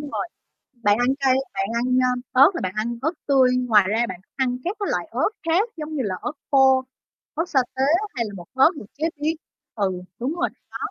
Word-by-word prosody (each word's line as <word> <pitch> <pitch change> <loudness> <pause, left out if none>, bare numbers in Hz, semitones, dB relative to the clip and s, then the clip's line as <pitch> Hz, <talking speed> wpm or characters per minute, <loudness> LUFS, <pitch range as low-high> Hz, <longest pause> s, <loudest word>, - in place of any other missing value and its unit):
rồi, 295 +4 -4 0.5
bạn 205 +1 +4
ăn 245 - +2
cay, 265 -1 +4 0.2
bạn 195 0 -1
ăn, 235 +1 0 0.2
a, 255 - +3 0.2
ớt 275 +6 +7
là - - -3
bạn 185 -1 -2
ăn 235 +2 -2
ớt 315 +4 +1
tươi, 260 -3 +4
ngoài 225 -6 +4
ra 230 +3 +1
bạn 180 -1 -7 0.2
ăn 250 -2 0
các 380 +5 -2
cái 405 - -1
loại - - -1
ớt - - +1 0.2
khác 365 +8 +2
giống 310 0 -6
như 270 - 0
là 200 -5 -2
ớt 245 - -3 0.2
khô, 265 -1 +5 0.5
ớt 330 +3 -2
sa 275 -5 +3 0.2
tế 260 - +1 0.3
hay 235 - 0
là 210 - -6
bột 175 - -11
ớt 265 +4 +6
được 290 - -8
chế 320 +3 -1
biến? 315 +2 +1 0.4
Ừ, 200 -3 0 0.3
đúng 265 +7 -2
rồi, 350 - 0 0.2
đó. - - -5
260 Hz, 225 wpm, -23 LUFS, 230-300 Hz, 0.5 s, ớt